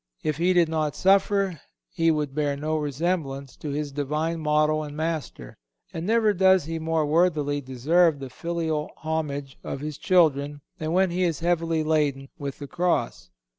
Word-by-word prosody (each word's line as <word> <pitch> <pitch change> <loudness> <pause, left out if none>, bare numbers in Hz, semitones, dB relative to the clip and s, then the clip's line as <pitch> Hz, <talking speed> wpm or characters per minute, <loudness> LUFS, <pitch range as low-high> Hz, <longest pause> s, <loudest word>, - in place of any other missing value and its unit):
If 155 -2 -1
he 180 +3 +2
did 175 -2 +4
not 155 -2 -1
suffer, 195 -3 +2 0.3
he 165 -1 +2
would 150 -3 0
bear 145 -1 0
no 155 +2 -2
resemblance 145 -2 -2
to 150 - -6
his 145 0 -3
Divine 150 +4 -2
Model 155 0 +2
and 150 -1 -7
Master; 155 - -4 0.3
and 165 +3 -4
never 220 -1 +3
does 190 -1 +4
he 165 +1 -4
more 160 -1 0
worthily 150 -2 +1
deserve 145 +6 +2
the 135 -2 -8
filial 160 -1 -2
homage 145 -4 -3
of 135 - -5
his 150 -1 -5
children 145 -5 +2 0.2
than 155 -1 -2
when 185 0 +3
he 180 +2 -1
is 165 -4 0
heavily 165 -2 +1
laden 145 -3 0
with 140 -1 -5
the 145 - -7
cross. 175 - -1
155 Hz, 170 wpm, -25 LUFS, 145-170 Hz, 0.3 s, did